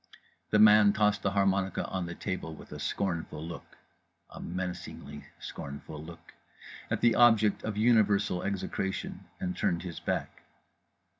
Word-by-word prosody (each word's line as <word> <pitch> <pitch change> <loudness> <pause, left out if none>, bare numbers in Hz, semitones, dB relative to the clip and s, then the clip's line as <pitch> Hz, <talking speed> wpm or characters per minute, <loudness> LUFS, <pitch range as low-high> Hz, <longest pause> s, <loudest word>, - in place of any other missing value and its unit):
The 105 - +3
man 105 -1 +7
tossed 105 0 +2
the 95 - +1
harmonica 95 -1 +1
on 95 -2 -3
the 85 - -6
table 95 -5 -4
with - - -14
a - - -7
scornful 85 -5 -3
look 85 0 -9 0.5
(a - - -10
menacingly 90 -5 -6
scornful 70 +2 -7
look) 85 +1 -12 0.6
at - - -1
the 120 -1 +5
object 115 -4 +4
of 105 -2 -3
universal 105 -4 +3
execration; 95 -1 -3
and 90 -1 -3
turned 85 -1 0
his 85 -3 -6
back. - - -3
95 Hz, 140 wpm, -30 LUFS, 85-105 Hz, 0.6 s, man